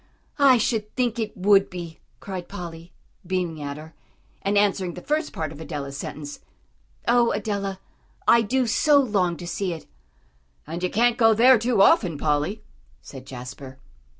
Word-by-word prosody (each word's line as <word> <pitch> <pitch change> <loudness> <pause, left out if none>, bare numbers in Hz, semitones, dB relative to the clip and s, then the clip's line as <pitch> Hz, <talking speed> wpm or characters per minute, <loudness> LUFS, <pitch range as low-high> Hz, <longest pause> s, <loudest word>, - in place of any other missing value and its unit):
"I 270 -3 +6
should 220 -2 -1
think 245 -3 0
it 215 -2 -4
would 195 +1 +4
be," 170 -3 -8 0.2
cried 185 -3 -6
Polly, 170 -3 -8 0.3
beaming 175 -4 -2
at 140 0 -5
her, 160 +1 -11 0.5
and 200 +1 0
answering 195 -3 +1
the 180 - -8
first 305 +2 -1
part 155 -2 -4
of 155 0 -10
Adela's 140 -4 -5
sentence. 145 +1 -7 0.7
"Oh, 240 0 +4
Adela, 200 -2 -3 0.5
I 235 - +6
do 250 +4 +1
so 290 +6 +4
long 195 -9 +1
to 175 - -8
see 180 +1 -2
it." 160 - -9 0.8
"And 165 +3 -6
you 180 - 0
can't 240 +4 +2
go 225 -1 +5
there 245 +2 +6
too 230 -3 +3
often, 185 - +4
Polly," 150 +8 -1 0.4
said 135 -2 -11
Jasper. 130 +1 -9
190 Hz, 160 wpm, -24 LUFS, 160-225 Hz, 0.8 s, I